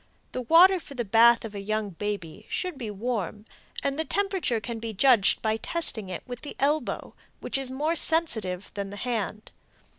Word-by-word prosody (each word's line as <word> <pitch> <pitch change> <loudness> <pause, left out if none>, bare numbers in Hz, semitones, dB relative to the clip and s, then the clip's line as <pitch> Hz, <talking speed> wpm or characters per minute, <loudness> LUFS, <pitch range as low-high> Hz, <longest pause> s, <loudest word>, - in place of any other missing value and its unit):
The 255 - -3
water 350 +9 +6
for 285 -4 -11
the 240 -2 -2
bath 230 +3 +6
of 215 - -7
a 200 - -5
young 215 0 -2
baby 195 -3 -5
should 365 -3 -2
be 240 -5 -5
warm, 210 -1 -3 0.4
and 280 +2 -1
the - - +2
temperature 380 - 0
can 230 +1 -5
be 225 -1 -5
judged 235 -2 +4
by 220 0 +1
testing 225 - -1
it 180 - -5
with 245 -1 -7
the 295 - -7
elbow, 295 +3 0 0.3
which - - -5
is 270 -1 0
more 300 +6 0
sensitive 220 - 0
than 200 -1 -4
the 205 - -8
hand. 215 -3 -3
235 Hz, 185 wpm, -27 LUFS, 210-285 Hz, 0.4 s, water